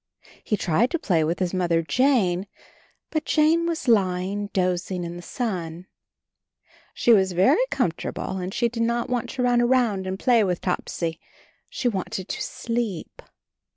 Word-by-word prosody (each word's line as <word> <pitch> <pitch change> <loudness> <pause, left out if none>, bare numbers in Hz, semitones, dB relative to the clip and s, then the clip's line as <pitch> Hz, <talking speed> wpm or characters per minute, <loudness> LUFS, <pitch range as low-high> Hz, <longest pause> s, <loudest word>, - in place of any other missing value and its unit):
He 210 - 0
tried 190 +7 +2
to 340 - 0
play 175 - +1
with 165 +3 0
his 185 -1 -1
Mother 170 -3 +1
Jane, 205 - +2 0.6
but 310 -1 -1
Jane 320 +3 +3
was 330 -5 -3
lying 195 -2 +1
dozing 180 -1 -1
in 170 0 -5
the 175 - -8
sun. 180 -7 -4 1.1
She 235 - +4
was 190 -3 +3
very 185 - +4
com 250 -11 +1
fortable, 190 +2 -5
and 180 +1 -4
she 235 +3 +1
did 235 0 -4
not 235 +2 0
want 245 -2 -1
to 255 - -2
run 245 -1 +3
around 240 -6 +2
and 190 0 -3
play 235 +1 +3
with 180 -3 0
Topsy; 165 -2 -3 0.5
she 260 - -2
wanted 190 -3 -3
to - - -3
sleep. 230 -7 -4
195 Hz, 160 wpm, -24 LUFS, 180-240 Hz, 1.1 s, She